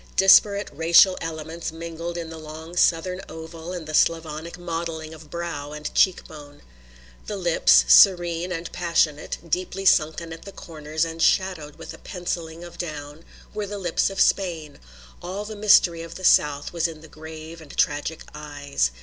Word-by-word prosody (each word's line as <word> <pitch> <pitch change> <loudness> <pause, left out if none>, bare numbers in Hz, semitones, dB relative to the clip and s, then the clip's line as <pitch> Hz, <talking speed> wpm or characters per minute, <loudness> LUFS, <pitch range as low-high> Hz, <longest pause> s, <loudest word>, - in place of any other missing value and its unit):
Disparate 200 +2 +5
racial 170 +4 +5
elements 165 +1 -5
mingled 165 +1 -6
in 165 -1 -6
the 165 - -8
long 160 +2 -10
Southern 180 +2 +2
oval 160 +1 -8
and 175 -3 -6
the 155 - -7
Slavonic 165 +1 0
modelling 165 -2 -5
of 155 -1 -13
brow 150 -4 -5
and 150 0 -6
cheek 185 -2 +2
bone. 145 -2 -13 0.6
The 210 - -4
lips, 65 - +4
serene 175 - +5
and 170 -1 -5
passionate, 165 -4 0
deeply 185 +3 -3
sunken 165 -1 +2
at 165 - -10
the 200 - -9
corners 155 -2 -4
and 165 0 -6
shadowed 175 -7 +1
with - - -9
a - - -13
pencilling 170 -2 -5
of 175 - -12
down, 150 -2 -6 0.3
were 210 -1 -4
the 205 +1 -5
lips 175 -2 0
of 195 - -7
Spain; 165 -6 0 0.4
all 190 +4 -5
the 215 0 -7
mystery 195 -5 +4
of 165 0 -9
the 185 - -9
South 145 -1 +3
was 170 0 +1
in 160 -2 -10
the 160 - -13
grave 160 +1 -10
and 150 -2 -13
tragic 150 +2 0
eyes. 145 - -2
165 Hz, 165 wpm, -24 LUFS, 155-175 Hz, 0.6 s, Disparate